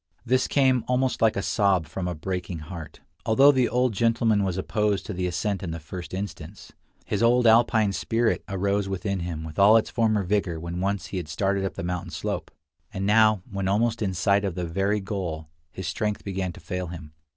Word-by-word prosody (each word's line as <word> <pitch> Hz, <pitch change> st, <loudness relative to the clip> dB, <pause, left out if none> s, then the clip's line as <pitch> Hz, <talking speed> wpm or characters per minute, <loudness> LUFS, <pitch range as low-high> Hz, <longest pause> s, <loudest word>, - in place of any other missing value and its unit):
This 130 Hz, +2 st, +2 dB
came 130 Hz, -3 st, +3 dB
almost 125 Hz, +1 st, 0 dB
like 115 Hz, -1 st, +4 dB
a 100 Hz, -, -1 dB
sob 100 Hz, -4 st, +2 dB
from 90 Hz, +4 st, -4 dB
a 90 Hz, -, -3 dB
breaking 90 Hz, +1 st, -4 dB
heart. 80 Hz, -1 st, -9 dB, 0.2 s
Although 135 Hz, +6 st, +6 dB
the 130 Hz, -3 st, +2 dB
old 125 Hz, -1 st, +1 dB
gentleman 115 Hz, -1 st, +2 dB
was 95 Hz, -2 st, -1 dB
opposed 105 Hz, +1 st, 0 dB
to 105 Hz, -, -5 dB
the 90 Hz, 0 st, -2 dB
ascent 95 Hz, +3 st, -2 dB
in 90 Hz, -, -4 dB
the 85 Hz, 0 st, -4 dB
first 85 Hz, +3 st, -8 dB
instance, 95 Hz, -1 st, -7 dB, 0.3 s
his 100 Hz, -, -2 dB
old 120 Hz, +1 st, +4 dB
Alpine 110 Hz, -2 st, +4 dB
spirit 115 Hz, +3 st, 0 dB
arose 100 Hz, +1 st, 0 dB
within 95 Hz, 0 st, -2 dB
him 85 Hz, -2 st, -4 dB
with 80 Hz, +2 st, -7 dB
all 105 Hz, +3 st, +7 dB
its 110 Hz, -, -1 dB
former 110 Hz, -3 st, +1 dB
vigor 90 Hz, -3 st, -1 dB
when 85 Hz, +2 st, -5 dB
once 100 Hz, +1 st, -1 dB
he -, -, -1 dB
had 90 Hz, -, -4 dB
started 100 Hz, +4 st, 0 dB
up 95 Hz, -, -3 dB
the -, -, -5 dB
mountain 90 Hz, 0 st, -3 dB
slope; -, -, -4 dB, 0.4 s
and 95 Hz, +1 st, -3 dB
now, 110 Hz, -2 st, +4 dB
when 100 Hz, -1 st, -2 dB
almost 115 Hz, +4 st, +1 dB
in 95 Hz, -3 st, -1 dB
sight 100 Hz, +3 st, +2 dB
of 95 Hz, -4 st, -2 dB
the 90 Hz, -, -2 dB
very 100 Hz, +5 st, 0 dB
goal, 85 Hz, -6 st, -4 dB, 0.2 s
his 95 Hz, 0 st, -6 dB
strength 105 Hz, +2 st, -2 dB
began 95 Hz, -2 st, -3 dB
to -, -, -12 dB
fail 90 Hz, 0 st, -4 dB
him. 80 Hz, -3 st, -9 dB
100 Hz, 205 wpm, -25 LUFS, 90-110 Hz, 0.4 s, all